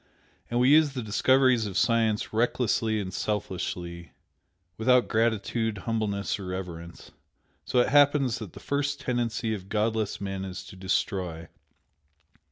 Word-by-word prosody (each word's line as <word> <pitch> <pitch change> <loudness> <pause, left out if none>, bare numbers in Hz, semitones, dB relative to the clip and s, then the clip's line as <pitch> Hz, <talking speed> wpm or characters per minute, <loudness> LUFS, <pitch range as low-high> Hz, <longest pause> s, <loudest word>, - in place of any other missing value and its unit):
And 120 - 0
we 125 +1 +4
use 150 -2 +5
the 125 -3 -4
discoveries 125 +1 +3
of 95 - -4
science 115 -3 +1
recklessly 115 -1 +1
and 95 -3 -5
selfishly 90 -4 -4 0.6
without 125 +4 +3
gratitude, 110 0 0
humbleness 105 -4 -1
or 95 - -7
reverence. 85 -2 -7 0.5
So - - -1
it - - +1
happens 145 -3 +4
that 105 -6 -8
the - - -10
first 145 0 -2
tendency 120 -4 -1
of 95 -2 -7
godless 110 -1 -1
men 95 -1 -4
is 95 -1 -6
to - - -12
destroy. 95 -3 -2
110 Hz, 135 wpm, -27 LUFS, 95-120 Hz, 0.6 s, use